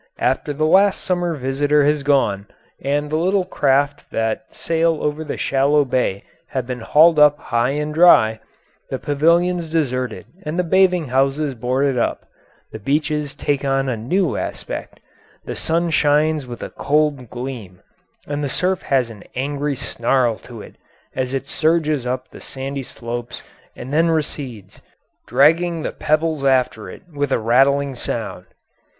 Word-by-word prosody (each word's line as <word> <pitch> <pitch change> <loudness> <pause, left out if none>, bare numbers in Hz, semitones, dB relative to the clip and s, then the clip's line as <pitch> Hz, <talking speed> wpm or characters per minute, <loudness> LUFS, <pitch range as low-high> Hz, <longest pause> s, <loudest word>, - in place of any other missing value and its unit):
After - - 0
the 150 +2 0
last 190 +4 +4
summer 175 -2 -1
visitor 145 +2 +1
has 150 0 +2
gone, 120 -8 +1 0.4
and 145 +2 -1
the 155 - +1
little 185 +3 +1
craft 145 -3 0
that 110 +3 -2
sail 165 0 0
over 150 +1 -1
the 150 - -5
shallow 140 +2 +2
bay 125 -6 -1 0.2
have 130 -2 -3
been 125 0 -5
hauled 155 +7 +5
up 150 0 +6
high 125 +3 -1
and 150 0 -3
dry, 110 -10 +5 0.5
the - - -2
pavilions 170 +3 +1
deserted 130 -6 -1 0.2
and 155 0 -4
the 180 - +2
bathing 180 -3 +2
houses 135 +3 +1
boarded 130 +2 0
up, - - -1 0.5
the 110 - -7
beaches 150 +4 -1
take 145 -1 -1
on 135 -1 0
a 125 - 0
new 160 - 0
aspect. - - -6 0.5
The - - -4
sun 170 +1 0
shines 150 -1 +2
with 120 -1 -7
a - - -6
cold 145 -4 0
gleam, 120 -8 -7 0.4
and 145 0 -3
the 140 - -1
surf 185 +7 0
has 130 -4 0
an 105 -3 -12
angry 140 +2 -2
snarl 120 -1 0
to 115 -4 -11
it - - -15 0.4
as 130 -1 -2
it 135 0 -3
surges 155 -4 +1
up 130 +1 -3
the - - -14
sandy 135 +1 -5
slopes 120 -1 -7 0.3
and 130 +3 -8
then 165 +2 +3
recedes, 135 - -4 0.5
dragging 160 +6 +3
the - - -2
pebbles 155 -1 0
after 125 -6 +1
it - - -11
with 145 -1 -2
a - - +3
rattling 135 +5 +2
sound. 125 - -5
140 Hz, 155 wpm, -20 LUFS, 125-155 Hz, 0.5 s, up